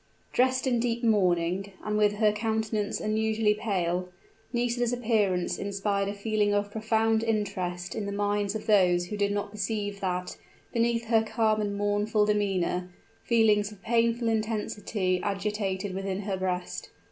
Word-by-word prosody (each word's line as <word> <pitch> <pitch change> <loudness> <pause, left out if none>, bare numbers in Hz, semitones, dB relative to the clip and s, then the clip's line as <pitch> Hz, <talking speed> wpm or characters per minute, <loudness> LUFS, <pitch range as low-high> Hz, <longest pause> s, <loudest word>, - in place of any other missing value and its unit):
Dressed 260 +1 +2
in 245 -3 +2
deep 235 0 -1
mourning, 190 -2 +2
and 210 - -1
with 210 -1 +3
her 210 0 +3
countenance 220 -1 -1
unusually 220 0 +1
pale, 180 -4 -1 0.4
Nisida's 240 0 0
appearance 215 -7 +1
inspired 200 0 -1
a - - -3
feeling 205 0 +1
of 205 0 0
profound 220 +1 +1
interest 190 -5 -2
in 210 -2 -3
the - - -3
minds 205 0 0
of 215 - -4
those 180 -5 +4
who 210 - -5
did 205 0 +1
not 205 0 -2
perceive 205 -1 -3
that, 180 -2 -3 0.4
beneath 235 0 +1
her 225 -1 +4
calm 220 -1 +1
and 205 -1 -2
mournful 205 +1 +1
demeanor, 190 -4 0 0.4
feelings 215 -3 +3
of 210 - -13
painful 230 +1 +2
intensity 210 -4 -1
agitated 200 -1 -2
within 195 0 -3
her 200 -1 -2
breast. 180 -1 -3
210 Hz, 145 wpm, -28 LUFS, 195-220 Hz, 0.4 s, those